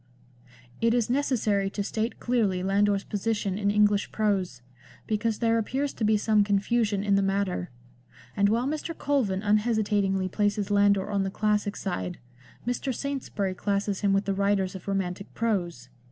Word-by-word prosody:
It 230 Hz, +1 st, +3 dB
is 240 Hz, -1 st, +1 dB
necessary 220 Hz, -8 st, +1 dB
to 200 Hz, +1 st, -3 dB
state 220 Hz, +3 st, -3 dB
clearly 210 Hz, -7 st, 0 dB
Landor's 200 Hz, +1 st, +2 dB
position 205 Hz, -2 st, -2 dB
in 200 Hz, -1 st, +1 dB
English 205 Hz, 0 st, +2 dB
prose, 195 Hz, -, -1 dB, 0.4 s
because 220 Hz, 0 st, -1 dB
there 230 Hz, 0 st, +2 dB
appears 270 Hz, +6 st, -2 dB
to -, -, -5 dB
be 215 Hz, 0 st, +4 dB
some 210 Hz, 0 st, +3 dB
confusion 205 Hz, 0 st, +1 dB
in 205 Hz, -1 st, +1 dB
the 195 Hz, -, +4 dB
matter; 195 Hz, -2 st, -1 dB, 0.7 s
and 200 Hz, 0 st, +3 dB
while 230 Hz, +3 st, +1 dB
Mr. 310 Hz, +3 st, -3 dB
Colvin 240 Hz, -10 st, 0 dB
unhesita 210 Hz, 0 st, +2 dB
tingly 190 Hz, -1 st, 0 dB
places 205 Hz, +1 st, -1 dB
Landor 200 Hz, -1 st, +3 dB
on 200 Hz, -1 st, +1 dB
the 195 Hz, -, -1 dB
classic 210 Hz, 0 st, 0 dB
side, 180 Hz, -2 st, -4 dB, 0.5 s
Mr. 245 Hz, +2 st, -1 dB
Saintsbury 255 Hz, -7 st, -3 dB
classes 200 Hz, +1 st, -1 dB
him 200 Hz, -1 st, +2 dB
with 195 Hz, +1 st, +2 dB
the 195 Hz, -, 0 dB
writers 195 Hz, -1 st, +1 dB
of 190 Hz, -1 st, -10 dB
romantic 195 Hz, -1 st, -3 dB
prose. 175 Hz, -, -2 dB
205 Hz, 160 wpm, -27 LUFS, 195-225 Hz, 0.7 s, be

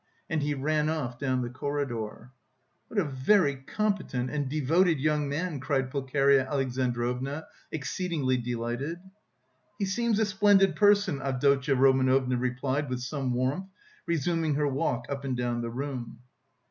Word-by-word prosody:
And 160 Hz, -1 st, +1 dB
he 145 Hz, 0 st, 0 dB
ran 150 Hz, +2 st, 0 dB
off 130 Hz, -6 st, -3 dB
down 130 Hz, -2 st, 0 dB
the 120 Hz, -, -3 dB
corridor. 130 Hz, -4 st, -4 dB, 0.6 s
"What 220 Hz, -, -1 dB
a -, -, +3 dB
very 140 Hz, +2 st, +2 dB
competent 135 Hz, -5 st, -2 dB
and... 145 Hz, -3 st, -2 dB
devoted 155 Hz, +3 st, +2 dB
young 150 Hz, 0 st, +1 dB
man!" 155 Hz, +1 st, -2 dB
cried 135 Hz, -1 st, -1 dB
Pulcheria 135 Hz, 0 st, +2 dB
Alexandrovna 130 Hz, +1 st, -1 dB, 0.3 s
exceedingly 155 Hz, -3 st, -1 dB
delighted. 120 Hz, +6 st, -3 dB, 0.8 s
"He 205 Hz, -, 0 dB
seems 225 Hz, +3 st, 0 dB
a 220 Hz, -, +3 dB
splendid 200 Hz, -1 st, +4 dB
person!" 205 Hz, -8 st, +3 dB
Avdotya 135 Hz, +1 st, +2 dB
Romanovna 130 Hz, -1 st, +3 dB
replied 130 Hz, +3 st, -1 dB
with 125 Hz, -1 st, -3 dB
some 130 Hz, 0 st, -2 dB
warmth, 135 Hz, +10 st, -1 dB, 0.4 s
resuming 165 Hz, -1 st, 0 dB
her 150 Hz, 0 st, +1 dB
walk 135 Hz, -3 st, -1 dB
up 140 Hz, -1 st, -4 dB
and 130 Hz, -2 st, -2 dB
down 120 Hz, -1 st, -1 dB
the 115 Hz, -, -3 dB
room. 125 Hz, -2 st, -5 dB
140 Hz, 140 wpm, -28 LUFS, 130-155 Hz, 0.8 s, splendid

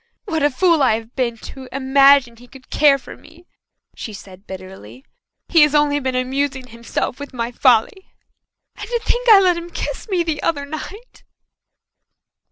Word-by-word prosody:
"What 320 Hz, -6 st, -2 dB
a 290 Hz, -, +3 dB
fool 335 Hz, +3 st, +2 dB
I 255 Hz, -5 st, +3 dB
have 225 Hz, +1 st, -9 dB
been 240 Hz, -3 st, -2 dB, 0.2 s
to 260 Hz, -1 st, -11 dB
imagine 275 Hz, -2 st, +4 dB
he 245 Hz, +2 st, -16 dB
could 260 Hz, 0 st, -17 dB
care 290 Hz, -2 st, +4 dB
for 270 Hz, -, -12 dB
me!" 345 Hz, +2 st, -19 dB, 0.5 s
she 220 Hz, -, -8 dB
said 195 Hz, -1 st, -13 dB
bitterly. 185 Hz, -, -11 dB, 0.4 s
"He 330 Hz, -, +4 dB
has 300 Hz, 0 st, +4 dB
only 295 Hz, -1 st, +2 dB
been 260 Hz, -2 st, -3 dB
amusing 265 Hz, +1 st, -2 dB
himself 235 Hz, +3 st, -4 dB
with 285 Hz, -2 st, -9 dB
my 235 Hz, 0 st, -3 dB
folly. 250 Hz, -, +1 dB, 0.6 s
And -, -, -9 dB
to 480 Hz, -1 st, -1 dB
think -, -, -1 dB
that 445 Hz, -, +9 dB
I -, -, +7 dB
let 360 Hz, -2 st, +2 dB
him 340 Hz, 0 st, -7 dB
kiss 450 Hz, -, -6 dB
me 365 Hz, -3 st, +1 dB
the 320 Hz, -3 st, -3 dB
other 285 Hz, -4 st, -1 dB
night!" 385 Hz, +11 st, -10 dB
275 Hz, 175 wpm, -19 LUFS, 240-320 Hz, 0.6 s, that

